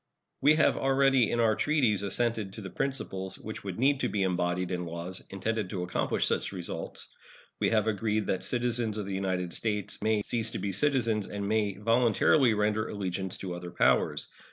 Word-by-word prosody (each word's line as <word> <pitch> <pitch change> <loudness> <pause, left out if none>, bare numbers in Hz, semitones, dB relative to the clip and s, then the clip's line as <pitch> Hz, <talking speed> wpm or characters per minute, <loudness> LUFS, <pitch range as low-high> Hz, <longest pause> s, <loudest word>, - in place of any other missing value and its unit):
We 150 +3 +6
have 155 - +3
already 135 -3 +3
in 120 - 0
our 110 -2 +3
treaties 125 -10 +2
assented 105 0 -1
to 110 - -7
the 95 -2 -7
principles 95 -9 -3
which 110 - -8
would 95 -3 -5
need 135 +2 +3
to 125 - 0
be 100 -2 0
embodied 90 0 0
in 90 -1 -1
laws 85 +2 -5
intended 105 +1 -2
to 90 -3 -3
accomplish 90 - 0
such - - 0
results. 90 -3 -4 0.5
We - - +2
have 110 -2 +2
agreed 110 0 0
that 95 - -1
citizens 120 -3 +1
of 105 - -3
the 100 - -4
United 95 -2 -2
States 105 -3 -1
may 110 -1 +1
cease 115 0 -1
to - - -5
be 100 - -2
citizens 115 -4 +1
and 100 -1 -4
may 105 -2 +1
voluntarily 115 +3 +3
render 105 +1 +1
allegiance 95 -2 -3
to 95 -2 -5
other 90 0 -6
powers. - - +2
105 Hz, 185 wpm, -29 LUFS, 95-115 Hz, 0.5 s, We